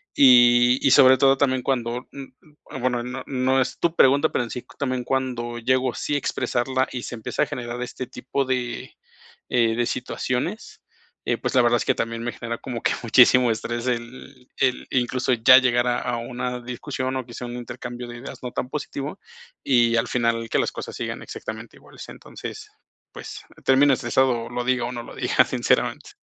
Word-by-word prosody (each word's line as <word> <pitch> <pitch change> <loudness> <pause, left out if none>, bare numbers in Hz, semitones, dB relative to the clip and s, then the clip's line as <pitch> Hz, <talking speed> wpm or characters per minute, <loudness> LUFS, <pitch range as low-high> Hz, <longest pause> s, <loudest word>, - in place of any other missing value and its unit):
Y 120 -1 +6
y - - +4
sobre 130 +1 +7
todo 135 +1 +5
también 130 -2 +1
cuando, 125 -1 -2
n 135 -2 -10
n 150 -3 -12
bueno, 125 -1 -1
no 125 +2 -6
no 130 0 +1
es 125 - -3
tu 170 - +1
pregunta, 140 +4 +5
pero 120 - -1
en - - -10
sí, 125 +1 -6
también 130 -3 -1
cuando 120 -2 -2
llego, 130 +1 +1
sí 145 - -2
a - - +3
expresarla, 130 -1 -1
y 125 -2 -4
se - - -6
empieza 115 +6 -2
a - - +1
generar 120 -1 -5
este 125 0 -5
tipo 135 +2 -3
de, 125 -2 -3 0.6
eh, 115 -2 +2
de 120 +1 0
situaciones, 130 - -3 0.4
eh, - - 0
pues, - - -3
la 130 - +6
verdad 120 0 +3
es - - -3
que - - +3
también 115 0 -3
me 120 - -2
genera 115 0 -5
como 120 -2 -6
que - - +1
muchísimo 125 +1 +5
estrés 120 +2 -3
el 125 +2 -5
el 130 -2 0
incluso, 125 0 0
ya 125 +2 +7
llegar 120 -2 +2
a 120 0 +1
a 120 -1 -2
una 125 +1 -4
discusión, 130 +2 -4
o 130 - -2
quizá, 120 0 -8
un 120 0 -6
intercambio 120 0 -7
de 120 0 -8
ideas 125 +4 -9
no 125 - -4
tan 125 - -3
positivo, 145 +3 -5 0.4
y 120 -3 +3
al 115 - +1
final 115 -2 0
que - - +1
las - - 0
cosas - - -7
sigan - - -5
exactamente - - -8
iguales. - - -13
Entonces, - - -9 0.4
pues, - - -9 0.2
terminas 135 0 +4
estresado, 120 -1 +1
lo 120 0 -3
diga, 125 -1 +1
o 120 - -4
no 120 -1 -6
lo - - -11
diga, - - +3
sinceramente. - - 0
125 Hz, 195 wpm, -23 LUFS, 120-130 Hz, 0.6 s, sobre